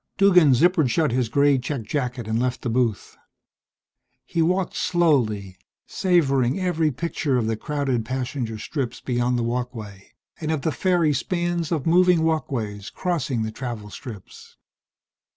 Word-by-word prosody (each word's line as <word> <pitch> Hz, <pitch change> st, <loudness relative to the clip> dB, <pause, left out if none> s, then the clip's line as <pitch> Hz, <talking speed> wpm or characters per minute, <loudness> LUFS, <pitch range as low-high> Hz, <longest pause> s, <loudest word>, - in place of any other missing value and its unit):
Duggan 180 Hz, -8 st, +6 dB
zippered 160 Hz, +1 st, +3 dB
shut 150 Hz, +3 st, +1 dB
his 125 Hz, -2 st, 0 dB
gray 140 Hz, +2 st, +3 dB
checked 125 Hz, -2 st, -4 dB
jacket 125 Hz, -3 st, -3 dB
and 110 Hz, +1 st, 0 dB
left 125 Hz, 0 st, -2 dB
the 120 Hz, -, -1 dB
booth. 115 Hz, -4 st, -1 dB, 1.1 s
He 170 Hz, -, -1 dB
walked 180 Hz, +3 st, +1 dB
slowly, 110 Hz, -, +1 dB, 0.3 s
savoring 140 Hz, -6 st, +1 dB
every 170 Hz, -4 st, +1 dB
picture 145 Hz, -1 st, -1 dB
of 120 Hz, -, 0 dB
the 110 Hz, 0 st, 0 dB
crowded 135 Hz, -1 st, -2 dB
passenger 125 Hz, -1 st, -3 dB
strips 125 Hz, +1 st, -4 dB
beyond 125 Hz, 0 st, 0 dB
the 120 Hz, -, 0 dB
walkway, 115 Hz, -5 st, -5 dB, 0.3 s
and 155 Hz, -, -4 dB
of 155 Hz, -3 st, -2 dB
the 160 Hz, -, +1 dB
fairy 175 Hz, -3 st, +2 dB
spans 175 Hz, +1 st, -1 dB
of 155 Hz, -5 st, -1 dB
moving 175 Hz, 0 st, +4 dB
walkways 115 Hz, -11 st, -2 dB
crossing 145 Hz, -10 st, -2 dB
the 110 Hz, -, -3 dB
travel 110 Hz, -4 st, -6 dB
strips. 110 Hz, -8 st, -11 dB
135 Hz, 145 wpm, -23 LUFS, 120-165 Hz, 1.1 s, Duggan